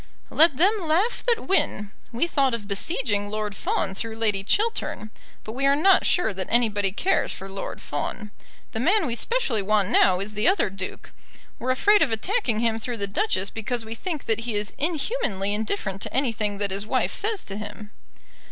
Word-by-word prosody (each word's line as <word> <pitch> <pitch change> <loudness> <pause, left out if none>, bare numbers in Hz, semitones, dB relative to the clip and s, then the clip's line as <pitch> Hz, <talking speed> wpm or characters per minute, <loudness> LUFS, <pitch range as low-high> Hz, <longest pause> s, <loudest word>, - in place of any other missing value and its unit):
"Let 310 -4 +6
them 375 +7 +5
laugh 360 +7 0
that 470 -2 +2
win. 210 - 0 0.2
We 240 +7 0
thought 275 -7 +1
of 210 -3 -8
besieging 205 - -1
Lord 210 -1 -3
Fawn 195 - -1
through 220 +3 -5
Lady 210 -3 0
Chiltern, 410 - -1 0.3
but 215 - -7
we 270 +4 0
are 280 - +4
not 375 +6 +4
sure 355 - +2
that 185 -1 -5
anybody 210 -5 +2
cares 365 - 0
for 195 - -7
Lord 195 0 -6
Fawn. 205 +8 -5 0.4
The 220 - -4
man 375 - +3
we 245 - -1
specially 270 - 0
want 205 -1 +2
now 180 -1 +4
is 200 +2 -4
the 210 +1 +1
other 375 - +2
Duke. 195 -1 -7 0.5
We're 250 - -3
afraid 410 +11 +4
of 285 - +3
attacking 230 - 0
him 225 -1 +1
through 240 +1 -4
the 200 - -1
Duchess 200 - 0
because 225 +1 -3
we 220 - -5
think 310 +5 -5
that 225 -1 +1
he 230 -1 -4
is 205 0 -2
inhumanly 290 - -1
indifferent 205 -2 -2
to - - -3
anything 225 -6 0
that 200 -1 0
his 200 +2 -2
wife 255 +2 0
says 420 -1 -1
to 195 - -7
him." 210 0 -8
225 Hz, 190 wpm, -24 LUFS, 205-310 Hz, 0.5 s, Let